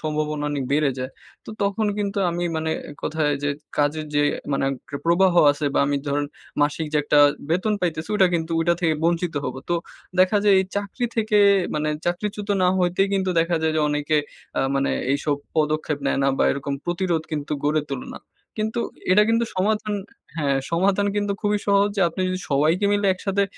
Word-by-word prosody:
সম্ভাবনা 150 -1 -2
অনেক 140 -3 -2
বেড়ে 145 -1 +3
যায়। 130 +1 -4 0.3
তো - - -8
তখন 200 +2 0
কিন্তু 200 -1 -2
আমি 175 +1 -2
মানে 160 0 -1 0.2
এক 145 - -12
কথায় 155 -1 0
যে 145 - 0 0.3
কাজের 150 +1 +1
যে 145 - +3 0.3
মানে 135 - +1 0.3
এট 140 - -4
প্রবাহ 175 +2 +4 0.2
আছে 145 +1 -5
বা, - - +3
আমি 145 0 +1
ধরেন 145 +1 0 0.4
মাসিক 150 +2 0
যে - - +2
একটা 145 0 +3 0.3
বেতন 185 +6 +1
পাইতেছি, 165 -3 -2
ওটা 190 - +5
কিন্তু 160 0 -2
ওইটা 170 +1 +2
থেকে 165 -2 +2
বঞ্চিত 170 -1 +1
হব। 130 - -3
তো 175 - +1 0.5
দেখা 185 +3 +4
যায় 205 -1 +6
এই - - -1
চাকরি 205 +5 -2
থেকে 215 -1 +2 0.4
মানে 150 0 -1 0.2
চাকরিচ্যুত 205 +3 -2
না 180 - +4
হইতেই 180 +2 +2
কিন্তু 190 -1 0
দেখা 165 0 +1
যায় 160 - +1
যে 155 - +2
অনেকে 150 +1 0 0.4
আ - - +3
মানে 135 0 +1 0.2
এইসব 145 +1 0 0.2
পদক্ষেপ 155 -1 0
নেয় - - +1
না 135 - +3
বা, - - +3
এরকম 140 0 -3
প্রতিরোধ 175 -2 -1
কিন্তু 150 0 -3
গড়ে 150 +1 +2
তোলে 135 -2 -5
না। - - -7 0.4
কিন্তু 220 +2 -1 0.3
এটা 210 - +6
কিন্তু 230 +1 +2
সমাধান 210 +2 0 0.4
হ্যাঁ, 140 -3 +1
সমাধান 195 +4 +2
কিন্তু 205 -1 0
খুবই 210 -1 +1
সহজ। 200 0 +4
যে - - +1
আপনি 165 - -7
যদি 185 0 -2
সবাইকে 155 +8 +2
মিলে 205 -1 +1
একসাথে 195 +1 -1
170 Hz, 190 wpm, -23 LUFS, 150-200 Hz, 0.5 s, যায়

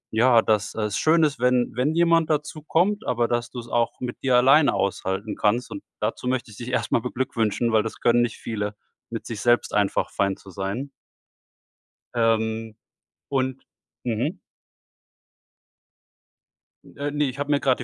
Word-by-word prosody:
ja, 115 0 +5
dass 105 -2 0
es 105 -2 -2
schön 160 +5 +4
ist, 150 -3 +1
wenn 125 -1 +2
wenn 140 +6 +1
jemand 170 -1 +3
dazukommt, 160 +7 0
aber, 120 -1 +1
dass 120 0 -1
du 125 - -7
's 120 - -9
auch 120 -1 0
mit 125 -1 -5
dir 130 -2 +2
alleine 135 +4 +5
aushalten 100 +1 -2
kannst. 115 +4 0
Und - - -6 0.2
dazu 125 - -2
möchte 125 -3 -1
ich 105 - -13
dich 120 - -7
erst 125 - -1
mal 115 - +3
beglückwünschen, 115 -3 -1
weil 110 -1 +4
das 115 - -6
können 120 0 +4
nicht 120 -2 -1
viele, 105 -2 -4 0.3
mit 115 -1 -6
sich 110 -3 -5
selbst 120 0 +2
einfach 100 -1 +1
fein 100 -1 0
zu 95 - -14
sein. 100 +9 -4 1.2
Ähm, 110 -1 0 0.5
und 130 -1 -1 0.4
mhm. 125 - -1 2.6
Äh, 145 +1 -2
ne, 150 0 0
ich 130 +2 -7
habe 145 0 -3
mir 145 -1 +3
grade 130 -2 +1
120 Hz, 160 wpm, -24 LUFS, 110-135 Hz, 2.6 s, ja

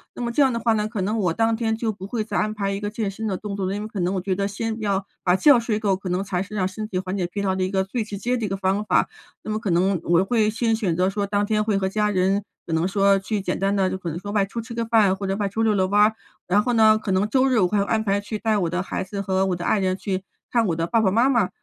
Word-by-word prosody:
那 - - -5
么 235 - -1
这 265 - +2
样 270 -2 +5
的 230 - -2
话 230 0 +2
呢， 210 -1 0
可 215 -2 -4
能 210 +4 -1
我 180 -5 +1
当 225 +2 +1
天 225 -1 -1
就 225 -1 -1
不 195 -2 -9
会 220 +1 -2
再 210 -1 -3
安 215 - +1
排 200 -2 -1
一 195 - -3
个 205 0 -3
健 210 -1 -3
身 220 +3 -5
的 190 -3 -1
动 205 0 -5
作 195 -2 -2
了。 195 - -2
因 205 - -4
为 - - -5
可 210 -2 -6
能 180 +2 0
我 185 - -1
觉 190 +1 -1
得 200 +1 -1
先 220 +2 -4
要 200 -2 -1 0.2
把 180 -1 +3
觉 280 +5 +6
睡 230 -2 -1
够， 200 -3 +1
可 185 0 -6
能 180 +2 0
才 185 -3 -2
是 205 +3 -7
让 185 -3 +1
身 215 +3 -6
体 190 - -4
缓 185 +1 -3
解 180 -2 -1
疲 200 +3 -4
劳 190 -1 +1
的 190 - -1
一 185 - -1
个 190 -1 +1
最 220 +5 -3
直 210 -1 -7
接 245 +5 -1
的 235 -3 -2
一 - - -3
个 195 - -1
方 195 +2 0
法。 - - +2 0.4
那 215 - -4
么 215 - -1
可 220 -3 -3
能 180 +2 +2
我 170 +2 +3
会 220 0 +2
先 225 +1 0
选 200 -7 -1
择 180 +2 +2
说 200 0 -2
当 205 0 0
天 215 0 +1
会 210 -2 +1
和 190 -1 0
家 210 +1 0
人 195 +1 +1 0.2
可 165 - -4
能 160 +2 +1
说 195 0 +3
去 205 +1 -2
简 - - -2
单 195 +1 +1
的， 190 -2 +2
就 190 - -3
可 180 -2 -5
能 160 - -4
说 205 +3 -6
外 205 -2 +2
出 200 +4 -6
吃 230 +1 -9
个 230 0 -2
饭 220 -4 +3
或 195 0 -4
者 195 - 0
外 205 0 -1
出 220 +3 -2
溜 220 -1 +3
溜 190 -1 +2
弯 205 +2 +3
儿， 215 +1 +4 0.3
然 200 +4 +3
后 245 - 0
呢， 220 -1 +5
可 215 -2 -4
能 190 +3 +1
周 260 +3 +3
日 255 -4 +3
我 185 - +4
会 205 +3 0
安 220 +2 0
排 200 -1 +1
去 210 +1 -5
带 220 -1 +1
我 175 -4 0
的 180 +2 -1
孩 190 - -3
子 195 +1 -5
和 190 -1 0
我 185 -2 0
的 175 - -6
爱 - - +2
人 185 -1 0
去 190 -2 -3 0.3
看 235 -2 +2
我 170 - 0
的 165 +1 -1
爸 230 - +2
爸 205 -4 +2
妈 235 +6 +3
妈， 230 -8 +2
200 Hz, 365 characters per minute, -23 LUFS, 190-220 Hz, 0.4 s, 觉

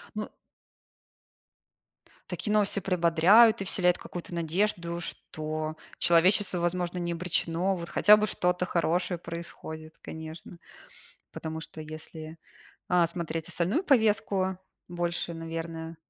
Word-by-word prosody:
Ну. 215 0 -4 2.0
Такие 210 - -3
новости 210 -1 +3
приободряют 185 +5 +5
и - - -2
вселяют 180 -2 +3
какую-то 175 0 -8
надежду, 170 0 -1
что 155 -1 -5 0.2
человечество, 180 +2 +4
возможно, 175 +1 -1
не 175 -1 -2
обречено. 175 +2 0
Вот 170 -1 -6
хотя 210 +1 +7
бы 215 0 +1
что-то 180 -1 0
хорошее 175 +1 0
происходит, 165 -2 -8
конечно. 160 +2 -9 0.7
Потому 160 0 -5
что 160 - -9
если, 155 +1 -9 0.5
а, 175 -2 +4
смотреть 165 -1 -4
остальную 180 - 0
повестку, 210 - +2 0.3
больше, 175 -1 -2
наверное, 165 0 -6
170 Hz, 110 wpm, -28 LUFS, 165-185 Hz, 2.0 s, хотя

